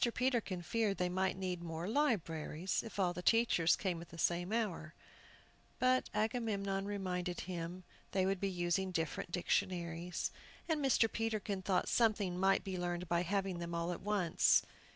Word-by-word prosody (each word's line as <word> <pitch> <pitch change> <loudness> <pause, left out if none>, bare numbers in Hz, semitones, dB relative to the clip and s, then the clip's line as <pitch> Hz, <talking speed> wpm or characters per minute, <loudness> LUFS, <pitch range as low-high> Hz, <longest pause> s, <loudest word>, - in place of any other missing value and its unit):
Peterkin 235 -8 0
feared 210 +2 0
they 180 0 +1
might 185 +1 0
need 180 -2 -3
more 165 0 -4
libraries, 190 - 0
if 225 - -9
all 180 -3 +2
the 180 - -5
teachers 225 -6 +4
came 180 -4 -2
at 170 - -11
the 165 - -11
same 175 +3 0
hour; 200 -8 -2 0.8
but 255 0 +3
Agamemnon 210 -3 -1
reminded 180 -3 -2
him 175 0 -5 0.3
that - - -5
they 185 - +4
would 195 0 0
be 195 - 0
using 180 +1 0
different 165 -1 -2
dictionaries. 175 -1 -1 0.4
And 315 -3 0
Mr. 250 -4 +4
Peterkin 215 -3 -2
thought 185 0 +1
something 210 -6 +2
might 195 +1 +3
be 190 -2 -4
learned 175 0 -2
by 170 0 +2
having 190 0 -1
them 170 0 -4
all 170 +1 -1
at - - -7
once. 195 -5 +3
185 Hz, 165 wpm, -36 LUFS, 175-210 Hz, 0.8 s, teachers